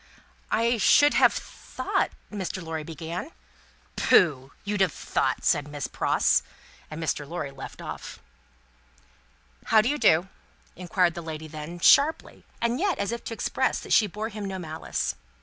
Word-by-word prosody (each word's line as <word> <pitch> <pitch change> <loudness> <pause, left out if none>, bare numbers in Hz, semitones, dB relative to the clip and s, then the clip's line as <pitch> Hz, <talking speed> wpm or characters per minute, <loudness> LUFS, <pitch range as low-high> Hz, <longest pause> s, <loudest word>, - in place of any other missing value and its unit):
"I 235 +2 +2
should 290 +8 +5
have - - +6
thought - - -3 0.2
" - - -33
Mr. 190 -2 -4
Lorry 160 -2 -4
began. 165 - -6 0.6
"Pooh! 140 -6 +3
You'd 205 -1 -2
have 190 -4 +3
thought!" - - -1
said 145 -1 +2
Miss 145 -1 -5
Pross; - - +2 0.5
and 155 - -7
Mr. 150 -2 -2
Lorry 160 -5 -4
left 135 -1 -9
off. - - -7 1.5
"How 220 - +5
do 220 - -1
you 295 +1 -1
do?" 170 -3 +4 0.5
inquired 180 -1 +1
that 170 - -6
lady 160 -1 -6
then 155 +2 -7
sharply, 285 - +4 0.2
and 235 +2 0
yet 385 -4 +1
as 200 - -2
if 235 - -5
to 225 - -4
express - - 0
that - - -2
she 215 - +5
bore 210 +3 -5
him 210 -2 -6
no 190 -1 -4
malice. 160 -3 -3
180 Hz, 160 wpm, -26 LUFS, 155-220 Hz, 1.5 s, have